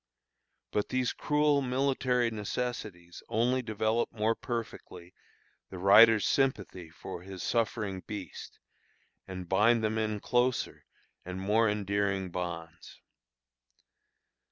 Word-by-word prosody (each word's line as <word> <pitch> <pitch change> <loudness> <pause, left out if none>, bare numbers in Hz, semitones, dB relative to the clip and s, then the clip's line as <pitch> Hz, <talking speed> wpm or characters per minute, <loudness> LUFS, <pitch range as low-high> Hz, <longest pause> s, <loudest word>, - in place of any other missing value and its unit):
But 105 - -1
these 130 -1 0
cruel 150 -1 +2
military 130 -2 +1
necessities 105 -5 -5
only 125 +3 +1
develop 110 0 -1
more 110 0 +1
perfectly 100 -7 -6 0.6
the 95 - -8
rider's 105 +3 +7
sympathy 100 -10 0
for 90 +1 -8
his 95 0 -8
suffering 105 -5 -1
beast, 100 -6 -8 0.7
and 95 -2 -7
bind 110 +5 +3
them 110 0 0
in 110 -1 -1
closer 125 +3 0 0.4
and 90 +1 -6
more 105 +3 +2
endearing 100 -2 -1
bonds. 85 -2 -6
105 Hz, 105 wpm, -30 LUFS, 95-120 Hz, 0.7 s, rider's